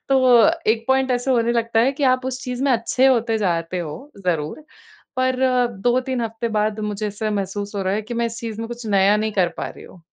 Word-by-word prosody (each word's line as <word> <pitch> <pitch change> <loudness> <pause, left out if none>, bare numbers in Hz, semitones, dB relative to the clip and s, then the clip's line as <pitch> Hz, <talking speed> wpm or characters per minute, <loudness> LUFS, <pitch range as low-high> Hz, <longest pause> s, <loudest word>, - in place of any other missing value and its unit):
तो 255 -2 +5 0.2
एक 225 0 0
पॉइंट 265 0 +2
ऐसा 245 +2 0
होने 235 -2 +2
लगता 230 -1 +1
है 260 +4 +3
कि 285 - -6
आप 255 0 +2
उस 255 -1 -4
चीज़ 250 0 -4
में 275 - +2
अच्छे 250 +3 +2
होते 235 -3 +2
जाते 175 -2 -1
हो 170 - -7 0.2
ज़रूर 165 - -2 0.5
पर 255 0 +1 0.5
2-3 255 +1 +1
हफ़्ते 225 0 -3
बाद 215 0 -1
मुझे 210 0 -3
ऐसा 210 +1 -3
महसूस 205 0 -3
हो 200 - -2
रहा 190 +1 0
है 215 - -1
कि 230 +3 -7
मैं 235 0 0
इस 230 0 -6
चीज़ 225 -3 -5
में 230 - -5
कुछ 240 -1 -7
नया 200 0 +4
नहीं 215 0 -1
कर 185 -4 +2
पा - - -4
रही - - -12
हूँ। 180 - -15
230 Hz, 230 wpm, -21 LUFS, 205-255 Hz, 0.5 s, तो